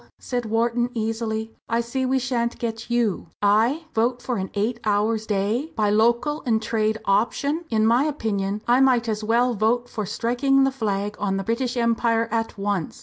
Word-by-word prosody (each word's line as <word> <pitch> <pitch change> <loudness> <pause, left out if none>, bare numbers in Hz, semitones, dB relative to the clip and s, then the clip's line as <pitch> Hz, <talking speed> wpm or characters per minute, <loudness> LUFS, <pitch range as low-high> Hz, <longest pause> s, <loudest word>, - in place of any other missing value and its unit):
said 245 -2 -3
Wharton, 235 +2 +1
easily, 220 0 -2 0.2
"I 230 0 +1
see 255 +3 -2
we 265 +1 +2
shan't 240 -2 -1
get 230 0 -4
you." 235 -7 0
"I! 225 +10 +2
vote 240 +3 +1
for 245 -1 -3
an 190 0 -3
eight 225 +4 -1
hours 215 +1 0
day, 215 +9 -1
by 210 -2 +2
local 235 +8 +2
and 230 -4 +2
trade 220 -1 0
option! 280 +11 +1
In 220 -1 +2
my 240 +5 +4
opinion 210 -8 -2
I 245 +2 +4
might 250 -3 +3
as 215 -1 -2
well 240 +3 +2
vote 235 +3 +1
for 215 -5 -4
striking 245 +5 +2
the 270 - +2
flag 210 -4 -2
on 195 -1 0
the 195 - -2
British 240 +3 -1
Empire 230 -1 +1
at 225 -1 -2
once! 200 -5 -2
230 Hz, 180 wpm, -23 LUFS, 215-245 Hz, 0.2 s, my